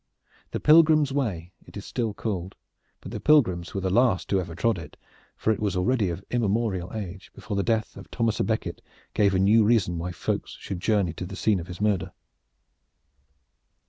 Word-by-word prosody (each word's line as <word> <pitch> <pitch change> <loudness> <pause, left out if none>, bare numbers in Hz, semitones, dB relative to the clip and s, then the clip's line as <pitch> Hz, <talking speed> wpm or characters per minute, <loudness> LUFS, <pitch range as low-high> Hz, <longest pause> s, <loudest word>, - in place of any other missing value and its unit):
The - - -3
Pilgrim's 155 -2 +5
Way, 95 -12 -2
it - - -10
still 115 -1 -2
is 105 - -8
called; 95 -5 -4 0.5
but - - -9
the - - -4
pilgrims 95 - +3
were 95 - -1
the 95 0 -1
last 115 -3 +2
who 100 - +3
ever 85 -3 -5
trod 110 +2 +1
it, 75 -3 -11 0.4
for 110 - +1
it - - -6
was 100 -4 -1
already 100 +1 +1
of 85 +3 -6
immemorial 105 -6 0
age 100 -3 -7
before 105 - -5
the 100 - +1
death 110 0 -1
of - - -11
Thomas 115 -2 -1
a - - +2
Becket 110 -1 -2 0.3
gave 100 -2 +3
a - - +3
new 105 +4 +5
reason 105 -6 +2
why 90 +2 -3
folk 90 - -3
should 95 -3 -7
journey 100 -4 +1
to 90 - -6
the 100 - -8
scene 105 -2 +1
of 85 - -7
his 90 -1 -8
murder. 105 -2 0
100 Hz, 195 wpm, -26 LUFS, 90-115 Hz, 0.5 s, Pilgrim's